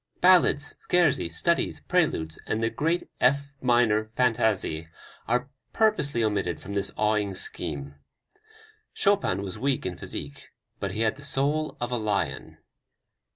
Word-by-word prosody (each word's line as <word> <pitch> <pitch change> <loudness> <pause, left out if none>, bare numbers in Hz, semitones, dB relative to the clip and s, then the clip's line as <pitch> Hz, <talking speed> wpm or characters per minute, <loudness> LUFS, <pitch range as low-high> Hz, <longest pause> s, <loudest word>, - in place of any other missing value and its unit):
Ballades, 175 -5 +4
Scherzi, 160 - +3
Studies, 170 - 0
Preludes 150 - 0
and 110 +1 -1
the 115 - +1
great 165 +3 0 0.2
F 140 +2 +2
minor 120 -4 +3
Fantaisie 110 -9 +1 0.4
are 125 +3 0 0.2
purposely 150 - +2
omitted 100 -6 0
from 100 +6 -8
this 100 -1 0
awing 105 -2 +1
scheme. 70 -5 -4 1.0
Chopin 195 - +2
was 95 -2 -6
weak 135 -1 0
in 90 -1 -3
physique, 70 -3 -7 0.3
but - - -3
he 110 - -3
had 110 +2 +1
the - - -12
soul 145 +3 0
of 120 0 -3
a 125 - +1
lion. 100 - -2
115 Hz, 135 wpm, -26 LUFS, 100-140 Hz, 1.0 s, Ballades